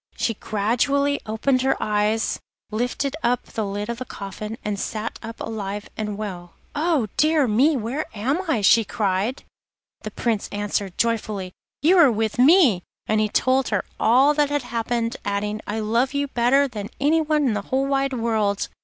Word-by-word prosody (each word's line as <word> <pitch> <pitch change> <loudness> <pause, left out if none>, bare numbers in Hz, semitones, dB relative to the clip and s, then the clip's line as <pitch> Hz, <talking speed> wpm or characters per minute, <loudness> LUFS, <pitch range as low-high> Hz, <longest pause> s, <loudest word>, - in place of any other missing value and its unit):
She 230 - 0
gradually 250 +8 0
opened 255 +4 +1
her 265 +1 +1
eyes, 210 +1 0 0.3
lifted 245 +5 -1
up 245 0 +1
the 220 - -4
lid 205 +1 -3
of 235 0 -4
the 255 - -5
coffin, 210 +1 -7
and 205 -1 -2
sat 215 +2 -4
up 225 0 -8
alive 205 -2 -5
and 210 -2 -4
well. 180 -5 -6 0.2
'Oh! 305 -4 +1
dear 305 -3 +3
me, 265 +8 +3
where 250 +7 -3
am 265 - 0
I?' 235 -9 +2
she 225 +3 +5
cried. 205 +4 -1 0.6
The - - -5
Prince 225 -4 -2
answered 205 -2 -2
joyfully, 215 -5 -1 0.3
'You 355 +4 +5
are 290 -7 +7
with 220 +1 -1
me,' 270 - +6 0.2
and 215 0 +1
he 215 - +1
told 260 +4 +2
her - - 0
all 265 +6 +5
that 295 -1 +2
had 290 -2 -1
happened, 235 0 -2
adding, 210 +1 -2
'I 220 +2 -2
love 235 +6 0
you 285 0 0
better 265 +3 +3
than 210 -5 -6
anyone 305 0 +2
in - - +1
the 205 - -1
whole 265 +1 +1
wide 275 0 0
world. 220 -4 0
230 Hz, 170 wpm, -23 LUFS, 210-275 Hz, 0.6 s, are